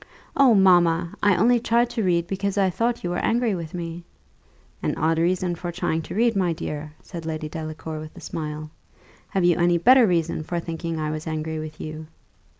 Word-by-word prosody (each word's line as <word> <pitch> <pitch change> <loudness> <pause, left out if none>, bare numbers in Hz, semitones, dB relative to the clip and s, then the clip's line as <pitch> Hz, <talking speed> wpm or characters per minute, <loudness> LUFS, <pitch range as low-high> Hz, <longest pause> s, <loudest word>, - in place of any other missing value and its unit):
"Oh, 265 -5 +6
mamma! 175 -3 +4
I 205 -2 +4
only 240 +4 +4
tried 235 +1 +2
to 235 -2 -1
read, 170 -2 +2
because 195 +2 -2
I 190 -2 +3
thought 235 +5 -1
you 175 - -2
were 175 - -1
angry 235 -2 +2
with 170 -2 -5
me." 170 0 -5 0.8
"An - - -1
odd 160 +1 +1
reason 180 +1 +1
for 175 +1 -5
trying 165 -2 -1
to 160 - -8
read, 230 +1 +2
my 180 -3 +1
dear!" 150 -1 -6
said 170 -3 -8
Lady 155 -1 -4
Delacour 155 0 -6
with 155 0 -10
a - - -8
smile: 155 -1 -5 0.6
"have 190 - 0
you 175 -2 +4
any 175 0 +4
better 245 +6 +6
reason 170 -3 0
for 170 +2 -3
thinking 165 -1 -4
I 155 0 -1
was 155 +1 -5
angry 155 0 -3
with 155 0 -7
you?" 155 0 -7
170 Hz, 200 wpm, -24 LUFS, 160-195 Hz, 0.8 s, Oh